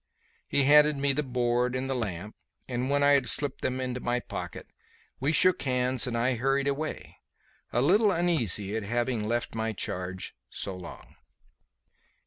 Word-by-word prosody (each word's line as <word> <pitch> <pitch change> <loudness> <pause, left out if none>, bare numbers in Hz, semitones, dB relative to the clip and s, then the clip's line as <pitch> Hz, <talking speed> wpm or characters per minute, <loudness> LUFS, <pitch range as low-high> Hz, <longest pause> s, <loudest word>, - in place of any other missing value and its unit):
He 140 - +2
handed 150 +1 +6
me 140 0 +1
the 150 - 0
board 125 -2 0
and 130 +1 -2
the 135 - -1
lamp, 105 -4 -4 0.3
and, 125 +1 -2
when 145 0 +2
I 145 - +5
had 140 -4 +3
slipped 140 +3 +2
them 130 0 -2
into 125 -1 -3
my 120 0 -1
pocket, - - -7 0.5
we 140 +4 +1
shook 185 +2 +4
hands 125 -1 +1
and 115 -1 -2
I 125 +3 +1
hurried 135 +3 +1
away, 145 +3 -4 0.5
a 120 - +1
little 205 +8 +4
uneasy 120 - +1
at 110 - -1
having 120 +2 -1
left 120 +1 -2
my 110 0 -2
charge 95 -1 -4 0.2
so 95 - -5
long. 90 - -11
125 Hz, 165 wpm, -28 LUFS, 115-140 Hz, 0.5 s, handed